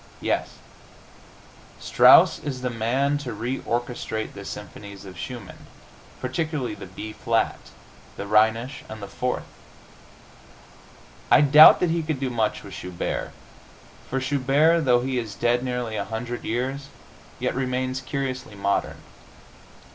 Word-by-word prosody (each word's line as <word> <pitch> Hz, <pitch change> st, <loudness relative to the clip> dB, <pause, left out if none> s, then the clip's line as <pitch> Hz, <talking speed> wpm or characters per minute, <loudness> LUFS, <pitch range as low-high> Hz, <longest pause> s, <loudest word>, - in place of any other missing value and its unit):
Yes; -, -, -2 dB, 1.2 s
Strauss -, -, +6 dB
is 130 Hz, -4 st, -5 dB
the 125 Hz, -, -1 dB
man 130 Hz, +6 st, 0 dB
to 135 Hz, -4 st, -6 dB
reorchestrate 120 Hz, -2 st, -3 dB
the 100 Hz, -, -9 dB
symphonies 100 Hz, 0 st, -9 dB
of 95 Hz, -1 st, -10 dB
Schumann, 120 Hz, -7 st, -8 dB, 0.5 s
particularly 145 Hz, 0 st, -2 dB
the -, -, -9 dB
B 110 Hz, +3 st, -8 dB
flat, 115 Hz, 0 st, 0 dB, 0.6 s
the -, -, -5 dB
Rhenish 110 Hz, +6 st, +2 dB
and 110 Hz, -, -7 dB
the 100 Hz, -, -7 dB
Fourth. 125 Hz, +5 st, -3 dB, 1.8 s
I -, -, +7 dB
doubt 150 Hz, +2 st, +9 dB
that 180 Hz, -2 st, +2 dB
he 170 Hz, 0 st, 0 dB
could 155 Hz, -3 st, -3 dB
do 130 Hz, -2 st, -2 dB
much 110 Hz, -3 st, -1 dB
with -, -, -10 dB
Schubert, 90 Hz, -1 st, -4 dB, 0.8 s
for 135 Hz, -, -1 dB
Schubert, 145 Hz, +5 st, +2 dB
though 120 Hz, -2 st, +4 dB
he 130 Hz, 0 st, -1 dB
is 110 Hz, -4 st, -6 dB
dead 120 Hz, +1 st, +1 dB
nearly 125 Hz, -3 st, -3 dB
a 100 Hz, -, -2 dB
hundred 120 Hz, +2 st, -5 dB
years, 130 Hz, +4 st, -3 dB, 0.5 s
yet -, -, -1 dB
remains 130 Hz, 0 st, -2 dB
curiously 130 Hz, -4 st, -4 dB
modern. 100 Hz, 0 st, -1 dB
125 Hz, 130 wpm, -24 LUFS, 110-135 Hz, 1.8 s, doubt